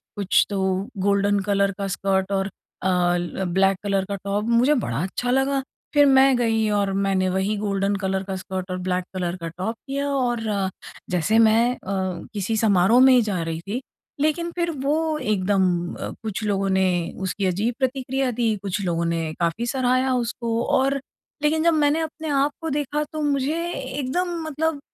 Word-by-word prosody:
कुछ 200 -2 +3
तो, 190 +2 -1
golden 200 +1 +2
colour 200 0 +1
का 200 -1 -2
स्कर्ट 195 0 0
और 195 0 0 0.4
अ, 190 - +2 0.3
ल 175 +2 -3
ब्लैक 195 0 +3
कलर 195 -1 0
का 200 - -1
टॉप 205 +2 -1
मुझे 245 +5 +4
बड़ा 150 - -1
अच्छा 245 +6 -2
लगा, 270 +1 +2 0.3
फिर 290 -1 +6
मैं 270 -1 +6
गई 225 -2 +1
और 200 -1 +1
मैंने 195 -1 +1
वही 190 +3 0
गोल्डन 200 -1 0
कलर 190 -1 -1
का 190 0 -4
स्कर्ट 185 0 -5
और 185 - -2
ब्लैक 180 0 -1
कलर 180 -1 -2
का 165 - -3
टॉप 205 +5 -2
किया 280 +1 -2
और 240 -3 0 0.7
जैसे 180 +6 +2
मैं 225 +2 +5
अ, - - -21 0.5
किसी 210 +2 -1
समारोह 210 +2 +4
में 265 0 +7
ही 245 - +6
जा 200 -6 -1
रही 165 0 -3
थी, 240 +6 -2 0.4
लेकिन 335 +3 0
फिर 340 -1 0
वो 310 +1 +1
एकदम 200 -4 +1 0.3
अ, - - -5
कुछ 215 0 -3
लोगों 195 -1 0
ने 190 0 +3 0.3
उसकी 190 +1 -2
अजीब 205 +7 0
प्रतिक्रिया 265 0 0
दी, 225 -2 0
कुछ 200 +1 -2
लोगों 170 -1 0
ने 165 -1 -1
काफ़ी 170 +8 0
सराहया 255 +1 +1
उसको 235 -1 -1
और 275 +1 +2 0.4
लेकिन 315 +1 +2
जब 335 -1 +4
मैंने 300 +1 +2
अपने 315 0 -5
आप 280 +1 +2
को 325 - -2
देखा 295 +1 -1
तो 310 - -3
मुझे 285 +1 0 0.2
एकदम 270 +6 -2 0.2
मतलब 315 0 -1
215 Hz, 180 wpm, -23 LUFS, 190-270 Hz, 0.7 s, में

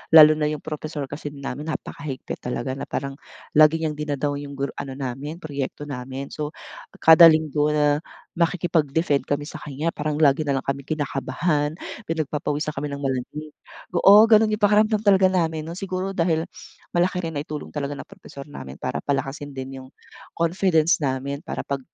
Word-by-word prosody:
lalo 155 -1 +11
na 150 -1 0
yung 150 - -3
propesor 150 -2 -5
kasi 145 +1 -6
namin 145 +2 -5
napakahigpit 145 -3 -6
talaga 125 +1 -3
na 135 - -6
parang 135 +1 -4 0.4
lagi 155 +1 +6
niyang 155 -2 -2
dina-down 145 -1 -2
yung 140 0 -8 0.2
ano 140 -1 -5
namin 140 +6 -5
proyekto 140 -1 -4
namin. 135 -1 -6
So 150 0 -5 0.5
kada 165 +1 +10
Linggo 155 -2 +3
na 150 0 +3 0.4
makikipag-defend 165 -3 +1
kami 145 +1 -2
sakanya 155 +1 -4
parang 150 0 -2
lagi 150 0 +4
nalang 140 -2 -1
kaming 140 0 -2
kinakabahan, 145 +1 -1 0.3
pinagpapawisan 155 -3 -2
kami 140 +1 -3
ng 140 - -5
malamig, 140 +3 -4 0.4
oo 205 +5 +8
ganun 220 -1 +5
yung 215 - -1
pakiramdam 210 +1 +4
talaga 195 -3 +4
namin 160 -4 0
nun 160 - -7
siguro 190 0 -3
dahil 165 -3 +1 0.5
malaki 180 +1 +1
rin 165 - -3
naitulong 150 0 -6
talaga 145 -1 -3
ng - - -7
propesor 185 -8 -11
namin 65 - -8
para - - -3
palakasin 140 0 -3
din 135 0 -6
yung 130 - -14 0.5
confidence 170 -1 +2
namin 140 0 -2
para - - -3
pag 140 -1 -3
150 Hz, 160 wpm, -23 LUFS, 140-165 Hz, 0.5 s, lalo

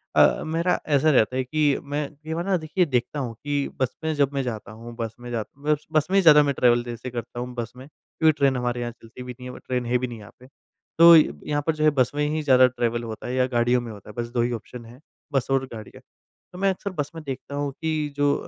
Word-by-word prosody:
अ, - - +5
मेरा 165 +3 0
ऐसा 150 +1 +3
रहता 125 -1 +3
है 130 - 0
कि 145 +1 +1
मैं 145 0 -3
कई 155 +2 -7
बार 170 +2 -3
ना 195 -1 +2
देखिए 160 +3 0
देखता 130 +1 -1
हूँ 120 -4 -3
कि 145 -1 -1
बस 130 -1 -1
में 160 0 0
जब 140 -1 +1
मैं 135 -1 -1
जाता 110 -4 -5
हूँ, 115 +2 -10
बस 115 -1 -4
में 120 0 -9
जाता 120 +4 -5
मत 150 - +3
बस 155 0 +2
में - - +2
ही - - +6
ज़्यादा 150 -3 +7
मैं 140 -1 0
ट्रैवल 120 -1 +3
जैसे 120 +1 -6
करता 120 0 -6
हूँ 125 0 -5
बस 120 -1 -4
में, 130 +2 -11
क्योंकि 160 +1 0
ट्रेन 135 -2 +3
हमारे 120 0 -2
यहाँ 120 0 -3
चलती 115 +1 -12
भी 125 - -7
नहीं 125 0 -8
है - - -8
ब - - -10
ट्रेन 125 -1 -1
है 125 +1 +2
भी 125 +1 -2
नहीं 115 -2 -8
यहाँ 105 - -13
पे। 125 - -15 0.5
तो 170 0 +10
यहाँ 145 - +2
पर 160 - +2
जो 155 - -2
है 155 - +6
बस 125 - +3
में 150 0 +1
ही 155 +1 -1
ज़्यादा 130 -2 +6
ट्रैवल 120 -1 -2
होता 110 0 -7
है 125 - -3
या 130 0 +3
गाड़ियों 120 0 +2
में 115 - -7
होता 105 0 -12
है, - - -9
बस 120 - -4
2 120 0 0
ही 120 +1 0
ऑप्शन 115 +1 -7
है, 120 +3 -14 0.3
बस 135 - +1
और 135 0 +2
गाड़ियाँ। 110 -2 -10 0.5
तो 180 - -9
मैं 195 0 +3
अक्सर 195 +1 -3
बस 145 0 -2
में 160 - -7
देखता 140 0 -6
हूँ 145 -1 -2
कि 155 -2 -1
जो 145 0 +3
130 Hz, 275 wpm, -24 LUFS, 120-150 Hz, 0.5 s, तो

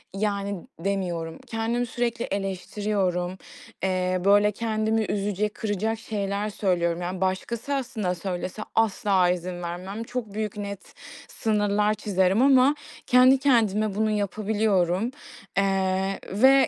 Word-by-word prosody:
Yani, 200 0 -1 0.2
demiyorum. 175 -3 -2
Kendimi 230 +2 -1
sürekli 235 0 -2
eleştiriyorum. 190 -1 -2 0.5
Eee, 185 -1 0
böyle, 205 +1 +5
kendimi 220 +1 0
üzecek, 205 +1 -1
kıracak 220 +1 -2
şeyler 205 -1 -2
söylüyorum. 175 -4 0
Yani, 180 +1 -4
başkası 220 +8 -1
aslında 230 -9 -2
söylese 180 +2 -4
asla 200 -4 +3
izin 180 0 -2
vermem. 185 +6 -5
Çok 235 -4 -5
büyük, 215 -1 -3
net 200 -1 -6 0.4
sınırlar 210 -1 +1
çizerim 195 -1 +1
ama 270 +1 +5 0.3
kendi 255 +1 +7
kendime 215 -6 +2
bunu 215 +1 +1
yapabiliyorum, 205 -1 +1 0.5
eee, 195 0 +1
ve 265 +6 +6
205 Hz, 110 wpm, -25 LUFS, 185-220 Hz, 0.5 s, kendi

